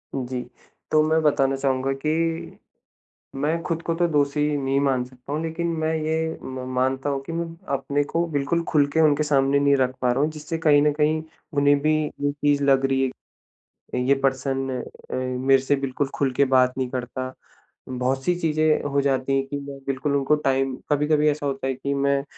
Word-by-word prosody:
जी। 125 -1 -3 0.5
तो 155 - +5
मैं 160 +1 +2
बताना 135 -2 +2
चाहूँगा 135 0 0
कि 165 +1 -1 0.9
मैं 165 +3 0
ख़ुद 165 -1 -1
को 165 - -1
तो 175 +1 +2
दोषी 145 -1 +1 0.2
नहीं 135 0 0
मान 130 -3 +1
सकता 130 +2 -11
हूँ। 155 +2 -1
लेकिन 165 +1 -3
मैं 160 0 0
ये 160 +1 -1
म 130 -1 -6
मानता 130 +2 0
हूँ 140 - -1
कि 165 - -6
मैं 170 +1 -2 0.3
अपने 140 +1 0
को 170 +3 -1
बिल्कुल 150 +4 0
ख़ुल 145 -2 +4
के 160 - +2
उनके 155 -1 +4
सामने 140 -1 +2
नहीं 140 0 +4
रख 130 -1 +1
पा 125 - +3
रहा 130 - -1
हूँ 155 - +1
जिससे 155 +1 -5
कहीं 150 -3 +4
न 150 0 +3
कहीं 155 +1 +1 0.3
उन्हें 145 0 +4
भी 155 +1 +2
ये 145 0 -2
चीज़ 145 0 +1
लग 135 -1 +3
रही 135 0 +1 1.0
है 125 - 0
ये 140 - +5
पर्सन 135 0 0 0.4
अ, - - -2
मेरे 130 +1 +2
से 145 +2 +2
बिल्कुल 135 0 -2
ख़ुल 135 -2 +1
के 140 - +5
बात 125 0 +4
नहीं 130 -1 -1
करता। 130 +1 -4 0.6
बहुत-सी 130 +6 0
चीज़ें 155 -1 +2
हो 140 - +2
जाती 135 -1 0
हैं 135 - +1
कि 145 - -4
मैं 140 0 -8
बिल्कुल 135 +1 -1
उनको 140 +2 +3
टाइम 135 -1 +1 0.2
कभी-कभी 150 +1 +3
ऐसा 145 0 -2
होता 135 -1 -2
है 135 - 0
कि 140 +2 -3
मैं 140 0 +1
140 Hz, 195 wpm, -24 LUFS, 135-155 Hz, 1.0 s, तो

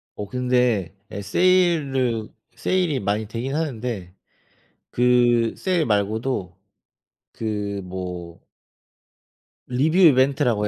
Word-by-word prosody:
어 105 - -6
근데 125 -7 0 0.2
예 100 - -5
세일을 135 - +2 0.3
세일이 180 -8 0
많이 105 0 -1
되긴 120 +5 -4
하는데 115 - -3 0.8
그 120 -2 +3
세일 180 -5 0
말고도 105 -2 -1 0.8
그 105 -3 -3
뭐 90 -2 -7 1.3
리뷰 145 +8 +1
이벤트라고 130 - +4
120 Hz, 180 characters per minute, -23 LUFS, 100-135 Hz, 1.3 s, 이벤트라고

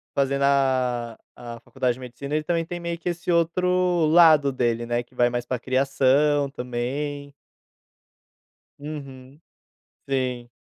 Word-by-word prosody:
fazendo 140 0 +1
a 130 -4 +1 0.2
a 120 -1 -8
faculdade 130 0 -1
de 130 - -13
medicina, 140 +4 -6
ele 155 - 0
também 165 0 -1
tem 175 0 -6
meio 170 0 -4
que 175 - -8
esse 175 0 -2
outro 180 0 +2
lado 155 -4 +6
dele, 120 -2 -1
né, 120 0 -1
que 125 +1 -27
vai 120 0 +3
mais 120 0 -3
para 125 0 -2
criação 135 +3 +2
também. 140 +3 -4 1.4
Uhum. 140 -1 -9 0.7
Sim. 125 -3 -2
140 Hz, 135 wpm, -24 LUFS, 125-155 Hz, 1.4 s, lado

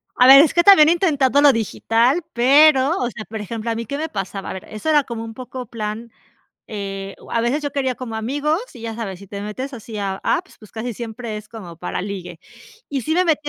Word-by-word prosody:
A 250 - +5
ver, 275 +1 +10
es 310 - +3
que 345 - +4
también 330 -6 +8
he - - +5
intentado 285 -6 +2
lo 290 -2 +7
digital, 230 - +1
pero, 275 +4 +5
o 245 - -1
sea, 225 -3 -8
por 220 0 -7
ejemplo, 225 +2 -5
¿a - - -2
mí 230 +1 -4
qué 280 +6 -4
me 320 +2 -3
pasaba?, 195 -3 -5
a - - -4
ver, 190 - -8
eso 215 +9 -4
era 300 -2 +4
como 235 -3 -6
un 225 0 -8
poco 255 +1 -7
plan, 220 +1 -5 0.5
eh, 195 -2 -6
o - - -15
a 230 - +1
veces 250 +6 0
yo 285 -1 -3
quería 265 -2 -1
como 230 -3 -6
amigos 290 - -1
y 240 - -12
ya 225 -1 -5
sabes, 200 -6 -5
sí 200 - -13
te 200 +1 -7
metes 255 +7 -6
así 225 -2 -8
a 195 -2 -2
apps, 370 - -1
pues, 215 - -16
casi 230 +2 -5
siempre 225 0 -6
es 210 0 -11
como 190 -7 -10
para - - -4
ligue. 180 -4 -7 0.5
Y 275 -2 -2
sí 315 - -1
me 365 +2 +2
metí 305 -3 0
235 Hz, 245 wpm, -20 LUFS, 215-285 Hz, 0.5 s, ver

